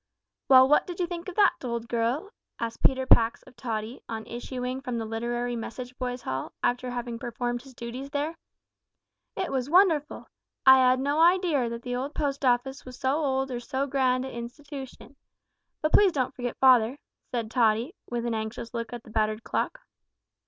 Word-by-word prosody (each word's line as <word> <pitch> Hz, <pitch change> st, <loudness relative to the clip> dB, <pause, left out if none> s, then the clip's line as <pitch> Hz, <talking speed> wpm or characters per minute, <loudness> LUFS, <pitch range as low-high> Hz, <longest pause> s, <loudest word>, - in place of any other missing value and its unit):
"Well, 260 Hz, -1 st, +8 dB
what 295 Hz, -, +4 dB
did 355 Hz, -1 st, -6 dB
you 355 Hz, -, +2 dB
think 345 Hz, +1 st, -6 dB
of 360 Hz, -, -9 dB
that, 410 Hz, -1 st, +5 dB
old 235 Hz, -2 st, -3 dB
girl?" 240 Hz, -, -1 dB, 0.3 s
asked 230 Hz, -1 st, -4 dB
Peter 260 Hz, -1 st, +3 dB
Pax 230 Hz, -2 st, +4 dB
of 260 Hz, -, -18 dB
Tottie, 230 Hz, -1 st, -4 dB
on 220 Hz, -1 st, -4 dB
issuing 250 Hz, +2 st, -5 dB
from 250 Hz, -3 st, -3 dB
the 225 Hz, -, -3 dB
Literary 240 Hz, +2 st, -2 dB
Message 245 Hz, +2 st, -6 dB
Boys' 250 Hz, -1 st, -3 dB
Hall, 130 Hz, +1 st, -4 dB
after 250 Hz, +1 st, 0 dB
having 240 Hz, -1 st, -4 dB
performed 240 Hz, 0 st, -3 dB
his 265 Hz, -1 st, -15 dB
duties 245 Hz, +4 st, -6 dB
there. 295 Hz, +3 st, -2 dB, 1.0 s
"It 375 Hz, -2 st, -2 dB
was 265 Hz, 0 st, -1 dB
wonderful. 330 Hz, -4 st, +3 dB, 0.4 s
I 265 Hz, 0 st, +9 dB
'ad 255 Hz, 0 st, +4 dB
no 285 Hz, +3 st, 0 dB
idear 335 Hz, -7 st, +4 dB
that 235 Hz, 0 st, -6 dB
the 250 Hz, +2 st, -2 dB
Post 280 Hz, -2 st, -1 dB
Office 260 Hz, +2 st, +1 dB
was 255 Hz, -1 st, -11 dB
so 265 Hz, 0 st, +1 dB
old 270 Hz, -3 st, 0 dB
or 245 Hz, -, -3 dB
so 265 Hz, +2 st, -2 dB
grand 260 Hz, -2 st, +1 dB
a' 265 Hz, -, -7 dB
institootion 270 Hz, +3 st, -8 dB, 0.7 s
But 310 Hz, -, +1 dB
please 410 Hz, -2 st, +6 dB
don't 260 Hz, -1 st, -1 dB
forget 245 Hz, -2 st, -4 dB
father," 255 Hz, -1 st, +5 dB, 0.3 s
said 230 Hz, -3 st, -3 dB
Tottie, 235 Hz, +4 st, +2 dB, 0.2 s
with 240 Hz, -1 st, -2 dB
an 235 Hz, -, -1 dB
anxious 220 Hz, +2 st, -5 dB
look 230 Hz, 0 st, -4 dB
at 240 Hz, -1 st, -7 dB
the 220 Hz, -, -14 dB
battered 215 Hz, 0 st, 0 dB
clock. -, -, -2 dB
250 Hz, 180 wpm, -27 LUFS, 235-275 Hz, 1.0 s, I